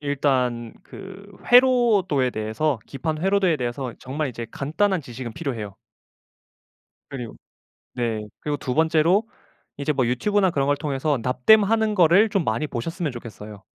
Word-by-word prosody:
일단 130 -5 -1
그 195 0 -11 0.2
회로도에 235 - +4
대해서 110 +6 -1
기판 155 +3 -4
회로도에 190 -3 +2
대해서 125 -1 -4
정말 140 +3 -3
이제 120 -2 -6
간단한 180 - 0
지식은 120 -3 -8
필요해요. 115 - -5 1.3
그리고 125 -5 -7 0.6
네 115 -3 -2 0.2
그리고 150 -1 -2
2 130 -3 -4
번째로 165 +7 +2 0.5
이제 145 +2 -1
뭐 130 -4 0
유튜브나 190 - +1
그런 140 -4 0
걸 145 0 +2
통해서 145 -1 -1
납땜하는 215 - +3
거를 185 +4 +5
좀 195 -4 0
많이 115 +6 -1
보셨으면 150 +4 -4
좋겠어요. 105 -3 -10
145 Hz, 320 characters per minute, -23 LUFS, 125-185 Hz, 1.3 s, 거를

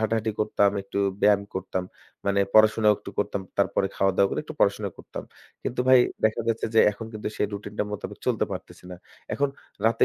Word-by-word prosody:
হাঁটাহাঁটি 110 0 0
করতাম, 105 -1 +3
একটু 100 +1 -5 0.2
ব্যায়াম 100 -1 +5
করতাম, 95 -1 -3 0.4
মানে 100 0 +3
পড়াশোনাও 110 0 +6
একটু - - -9
করতাম। 100 -1 -1 0.2
তারপরে 100 0 +2
খাওয়া-দাওয়া 95 0 +3
করে - - -1
একটু 155 - -8
পড়াশোনা 100 0 +2
করতাম। - - -8 0.4
কিন্তু 125 - -2
ভাই 130 0 +8 0.3
দেখা 110 +1 +2
যাচ্ছে 115 0 0
যে 110 - +7
এখন 115 +2 -8
কিন্তু 105 -1 -4
সেই - - +1
routine-টার 105 0 -4
মোতাবেক 105 - -6
চলতে - - +2
পারতেছি - - -8
না। 90 - -7 0.4
এখন 140 0 +1 0.4
রাতে 115 0 +4
105 Hz, 180 wpm, -26 LUFS, 100-110 Hz, 0.4 s, ভাই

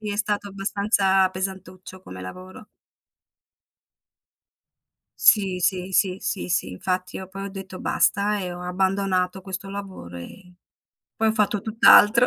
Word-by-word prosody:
Sì, 210 -1 -4
è 205 - -3
stato 205 -1 -1
abbastanza 195 -1 +2
pesantuccio 185 0 -7
come 95 - -10
lavoro. 185 - -10 2.5
Sì, 195 -4 +4
sì, 185 +1 0
sì, 185 -1 +2
sì, 195 - -3
sì. 175 - 0
Infatti 185 - -3
io 190 -1 -7
poi 195 +1 -7
ho - - -5
detto 190 -1 -8
basta 205 +1 +1
e 180 -1 -4
ho 175 - -7
abbandonato 190 0 0
questo 190 0 -6
lavoro, 190 - -8
e 180 - -11 0.7
poi 225 - +1
ho - - +2
fatto 210 -1 +1
tutt'altro. 225 +2 +6
190 Hz, 135 wpm, -24 LUFS, 185-200 Hz, 2.5 s, tutt'altro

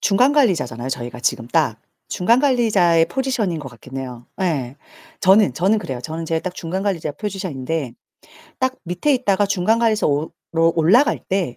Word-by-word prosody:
중간 245 +8 +3
관리자잖아요, 155 - +1
저희가 120 -2 -5
지금 120 -1 -1
딱. 135 -8 +1 0.3
중간 225 +7 +2
관리자의 210 - +3
포지션인 230 -5 -1
것 145 -3 -7
같긴 130 +2 -12
해요. 125 -2 -8
예. 140 -8 -1 0.4
저는 190 - +5
저는 195 +8 +2
그래요. 130 -11 -5
저는 160 +6 -5
제가 165 0 0
딱 180 +1 -5
중간 185 +3 -4
관리자 170 -7 -1
포지션인데 160 - -4 0.7
딱 260 0 0
밑에 180 - 0
있다가 205 -5 +1
중간 200 +3 +1
관리소로 185 -10 +1 0.5
올라갈 230 - +4
때 185 -10 -2
175 Hz, 355 characters per minute, -20 LUFS, 140-210 Hz, 0.7 s, 저는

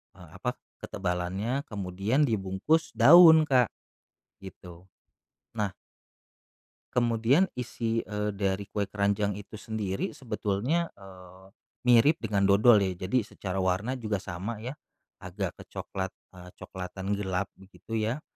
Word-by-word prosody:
eee, - - -14
apa, - - -2 0.2
ketebalannya, 95 +9 -3
kemudian 100 +6 -1
dibungkus 110 +7 0
daun, 160 +6 +9
Kak, 130 -5 +3 0.8
gitu. 90 -2 -12 0.7
Nah 105 -4 -2 1.2
kemudian 120 +9 +3
isi, 115 -2 -2
eee, 105 0 -2
dari 100 0 -1
kue 105 -1 -1
keranjang 100 0 0
itu 105 +2 -11
sendiri 105 -3 -3
sebetulnya, 120 +7 -2
eee, 95 -1 -14 0.4
mirip 135 +7 +5
dengan 100 -3 +1
dodol 105 +3 +6
ya, 95 - -2
jadi 100 +6 -1
secara 95 -4 -6
warna 95 +8 0
juga 105 -5 -3
sama 100 +4 -5
ya, 130 +5 -6 0.4
agak 95 0 -5
kecoklat, 95 -1 -6 0.2
eee, 90 0 -11
coklatan 95 +2 -5
gelap 95 -1 -2
begitu, 100 +4 -8
ya. 110 +7 -1
105 Hz, 120 wpm, -28 LUFS, 95-120 Hz, 1.2 s, daun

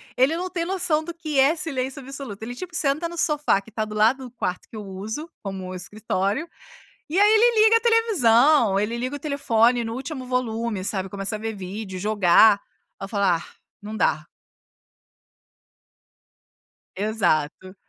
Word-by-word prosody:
Ele 270 +6 +3
não 365 +1 -3
tem 345 -2 -2
noção 345 -4 0
do 340 - -6
que 315 -4 -4
é 280 +5 +5
silêncio 275 -5 -4
absoluto, 265 -6 -8
ele, 240 +2 -6
tipo, 355 +5 -8
senta 305 +3 0
no 345 - -9
sofá 300 - +2
que 200 - -17
está 220 0 -3
do 215 0 -7
lado 230 +5 +3
do 245 - -9
quarto 180 -7 -4
que - - -12
eu 215 - -5
uso, 215 - -6
como 190 -2 -6
escritório, 205 - -2 0.6
e 340 +5 -1
aí 415 +1 +6
ele 440 0 +5
liga 450 +1 +6
a 455 - +2
televisão, 295 - +4
ele 225 +3 -2
liga 255 +4 -3
o - - -7
telefone 245 -5 +2
no 225 - -4
último 265 +1 -6
volume, 230 -4 -2
sabe, 195 -2 -2
começa 200 +2 -4
a - - -8
ver 220 +1 -4
vídeo, 190 0 -6
jogar, 205 0 +5 0.4
ai - - -6
eu 195 - -7
falo: 200 -2 -1
"Ah 175 -3 +2 0.4
não 215 +1 -7
dá". 155 -6 +1 2.7
Exato, 185 -3 -1
235 Hz, 170 wpm, -23 LUFS, 205-305 Hz, 2.7 s, aí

